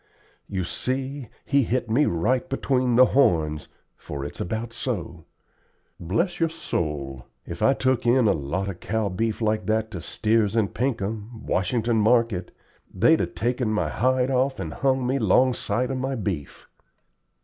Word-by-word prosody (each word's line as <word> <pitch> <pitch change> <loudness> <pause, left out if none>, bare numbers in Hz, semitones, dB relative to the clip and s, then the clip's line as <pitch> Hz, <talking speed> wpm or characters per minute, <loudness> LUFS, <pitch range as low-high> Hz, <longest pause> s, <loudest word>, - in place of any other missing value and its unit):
You 95 -2 -2
see, 130 +7 -3 0.2
he 140 0 +3
hit 125 0 -1
me 125 +7 +3
right 105 +10 0
between 130 -2 +1
the 130 +2 +8
horns, 80 - +2 0.3
for 70 -1 -6
it's 75 - -7
about 110 +4 -3
so. 90 -10 -4 0.7
Bless 115 - -1
your 165 -1 +2
soul, 75 - -4 0.2
if - - -7
I'd 135 - +3
took 130 -2 +1
in 120 -1 +4
a - - +5
lot 80 +6 -2
of 95 -3 -5
cow 110 -1 -1
beef 110 +4 -2
like 110 -2 0
that 110 0 0
to 90 - -6
Steers 110 +4 +1
and 105 -6 +1
Pinkham, 110 -2 -3
Washington 115 +4 0
Market, 110 -4 +2 0.4
they'd - - +4
'a - - 0
taken 120 +1 -1
my 105 0 0
hide 130 +1 +1
off 130 +1 +1
and - - -4
hung 130 -2 +1
me 130 +2 +1
up - - -3
'longside 125 0 +2
of 130 - -2
my 135 +1 -2
beef." 95 - -5
115 Hz, 160 wpm, -24 LUFS, 95-130 Hz, 0.7 s, the